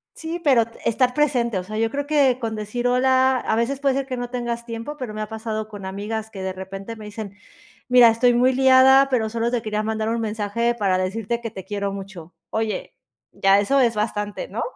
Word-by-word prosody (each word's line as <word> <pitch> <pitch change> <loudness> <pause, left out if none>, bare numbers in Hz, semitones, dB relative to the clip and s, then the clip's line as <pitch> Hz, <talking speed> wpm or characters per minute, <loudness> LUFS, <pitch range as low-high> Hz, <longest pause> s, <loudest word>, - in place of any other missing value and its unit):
Sí, 330 +2 -5
pero 260 -7 +5 0.2
estar 250 +2 +2
presente, 250 -8 +1
o - - -5
sea, 215 +3 -6
yo 225 0 0
creo 285 +1 -3
que 275 -4 +3
con 225 -3 -3
decir: 215 +3 -3
"Hola", 260 +1 +3
a 230 - -1
veces 240 +4 -1
puede 275 -1 +2
ser 275 0 -1
que 255 -2 -4
no 245 0 -4
tengas 240 -1 -3
tiempo, 230 +5 -6
pero 250 -6 -6
me 215 - -5
ha 215 - -3
pasado 220 -1 -4
con 205 -3 -9
amigas 210 +3 -5
que 195 - -8
de 190 0 -3
repente 195 +4 -7
me 215 -1 -10
dicen: 210 -1 -7 0.5
"Mira, 250 -1 +7
estoy 240 +2 +3
muy 250 +2 +4
liada, 265 +1 +6
pero 230 -4 +1
solo 230 +1 -1
te 240 -2 -1
quería 215 -1 -2
mandar 220 0 -2
un 230 0 -1
mensaje 225 +2 -1
para 195 -5 +1
decirte 210 +5 -2
que 230 -1 -5
te 190 -2 -9
quiero 200 0 -3
mucho". 190 -4 -9 0.2
Oye, 220 -1 -3 0.4
ya 195 +1 +4
eso 275 +7 +2
es 235 -3 +3
bastante, 210 - -3
¿no? - - -4
230 Hz, 220 wpm, -22 LUFS, 210-250 Hz, 0.5 s, Mira